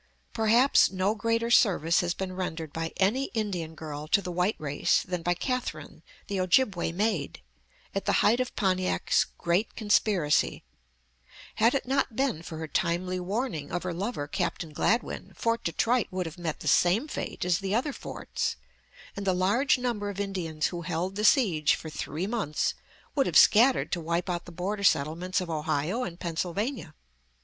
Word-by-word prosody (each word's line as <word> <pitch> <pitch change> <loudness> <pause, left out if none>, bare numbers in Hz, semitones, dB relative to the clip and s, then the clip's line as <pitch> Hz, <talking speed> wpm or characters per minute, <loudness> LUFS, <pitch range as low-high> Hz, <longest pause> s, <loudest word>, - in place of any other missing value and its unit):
Perhaps 230 +4 +4
no 190 +2 +1
greater 230 +1 0
service 175 -8 +4
has 175 -2 -1
been 190 -1 -4
rendered 165 -5 -4
by 165 0 -3
any 225 +8 +2
Indian 180 -7 -2
girl 155 -1 -7
to 180 - +4
the 180 -2 -5
white 180 +4 +1
race 145 -2 +1
than 180 -2 -4
by 175 +1 +1
Catherine, 255 +6 -4 0.2
the 200 -1 -3
Ojibway 185 -2 +2
maid, 190 -5 -1 0.5
at 195 - -2
the - - +2
height 230 +4 +4
of 255 - -2
Pontiac's 185 -3 +1
great 175 +6 0
conspiracy. 205 -7 +2 0.9
Had 230 +4 +4
it 275 - -1
not 270 -3 0
been 265 - 0
for 165 -1 -8
her 160 0 -5
timely 180 +5 -1
warning 190 - -3
of 175 0 -2
her 180 -1 -3
lover, 185 -4 -3
Captain 170 -2 -3
Gladwyn, 230 +9 -1
Fort 230 0 -1
Detroit 230 +8 +1
would 185 -1 -3
have 165 +2 -8
met 165 -3 -4
the - - -6
same 200 - +3
fate 295 - -4
as 180 -1 +2
the 195 +1 -1
other 270 +5 0
forts, - - -4 0.6
and 200 0 -5
the 190 - +3
large 205 +11 +2
number 235 -5 -2
of 200 -1 -6
Indians 180 -6 -2
who 175 - -4
held 175 +2 -3
the 210 - -2
siege 180 - +4
for 160 - -8
three 150 +4 -4
months 205 -9 -1 0.4
would 275 -2 +2
have - - +3
scattered 245 +5 +5
to 175 - -1
wipe 170 +3 -1
out 175 -1 -3
the 175 - -10
border 195 +4 -3
settlements 175 +3 +1
of 180 -2 -5
Ohio 155 - -1
and 175 -6 -6
Pennsylvania. 175 - -3
185 Hz, 175 wpm, -28 LUFS, 170-220 Hz, 0.9 s, scattered